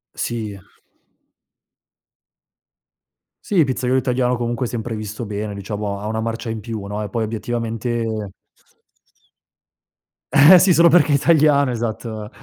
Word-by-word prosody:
Sì. 110 -4 -4 2.8
Sì, 185 -6 +2
pizzaiolo 130 -1 0
italiano 125 0 0
comunque 120 +1 -2
è - - -4
sempre 115 -1 -4
visto 105 +2 -6
bene, 105 0 -4
diciamo, 100 0 -5
ha 105 - -6
una 110 +1 -2
marcia 115 +1 -4
in 110 - -4
più, 110 -1 -6
no, 105 +1 -4
e 105 - -5
poi 115 +3 -2
obiettivamente 115 -1 -3 2.0
Eh 155 +6 +8
sì, 185 -1 +4
solo 170 +2 +6
perché 155 -3 +4
è - - +5
italiano, 145 -3 +3
esatto. 110 -2 -4
115 Hz, 125 wpm, -20 LUFS, 105-130 Hz, 2.8 s, Eh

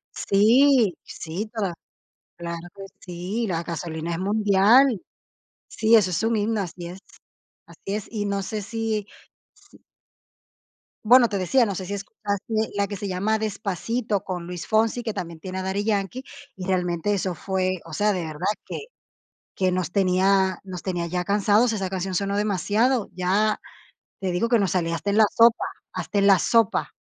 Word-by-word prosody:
Sí, 230 - +4
sí, 175 +7 -5
toda 195 -6 -2 0.6
claro 170 0 -6
que 195 - -8
sí, 185 +6 -4
la 170 -3 -1
Gasolina 165 0 -4
es 165 - -2
mundial. 210 +4 +4 0.7
Sí, 225 +1 +2
eso 205 -5 +5
es 170 - -1
un 225 0 +1
himno, 215 0 0
así 175 -1 -6
es, 180 +2 -8 0.7
así - - -17
es. 205 +1 -3
Y 210 -2 -3
no 200 -1 -1
sé 210 +2 -4
si 220 -1 -2 0.6
si - - -20 1.2
bueno, 240 +1 +7
te 200 - -2
decía, 240 +8 +3
no 200 -4 -2
sé 185 - -5
si 200 - -4
escuchaste 210 +2 -3
la 200 0 +1
que 205 - -5
se 200 - -5
llama 200 +4 0
Despacito, 210 +1 -2
con 180 -3 -5
Luis 180 -1 -6
Fonsi, 225 +2 +1
que 220 -2 -3
también 170 -2 -6
tiene 185 +1 -5
a 190 - -2
Daddy 195 +2 -2
Yankee, 215 +4 -1 0.3
y 185 - -6
realmente 180 +1 0
eso 185 -2 -1
fue, 185 0 -1
o 165 - -11
sea, 210 +5 +2
de 180 -3 -2
verdad 155 -1 -5 0.2
que - - -5 0.8
que 185 -1 +1
nos 180 0 -1
tenía 190 0 +2
nos 185 -2 -8
tenía 175 -3 -2
ya 180 +1 -2
cansados, 210 +4 +3
esa 195 -3 -2
canción 190 0 -3
sonó 200 +2 -1
demasiado. 210 +4 +1
Ya 195 +4 +1 0.6
te 190 -1 -2
digo 180 +7 0
que 235 - +5
nos 195 -5 +1
salía 170 -2 0
hasta 200 +4 -2
en 205 - +1
la 220 - +8
sopa, 230 0 +4 0.3
hasta 185 +2 -3
en 200 - +3
la 195 -2 +6
sopa. 230 0 +2
195 Hz, 175 wpm, -24 LUFS, 180-215 Hz, 1.2 s, la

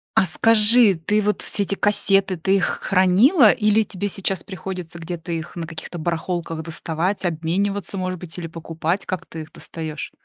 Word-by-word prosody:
А - - +4
скажи, 220 +2 +5
ты 205 +7 0
вот 210 +1 -1
все 205 - 0
эти 200 - -2
кассеты, 195 -2 +3
ты 190 +4 +1
их 195 - +2 0.2
хранила 205 - +5
или 215 0 +2
тебе 205 -1 -4
сейчас 195 -2 -2
приходится 180 -2 -7
где-то 170 0 -6
их 165 +1 -5
на 165 -2 -5
каких-то 165 +1 -7
барахолках 165 0 -3
доставать, 165 +4 -3
обмениваться, 185 +5 -2
может 185 -1 -3
быть, 175 -1 -9
или 170 - -5
покупать, 165 +3 -3
как 185 - -4
ты 160 - -8
их 155 0 -11
достаешь? 155 -3 -7
185 Hz, 170 wpm, -21 LUFS, 165-200 Hz, 0.2 s, скажи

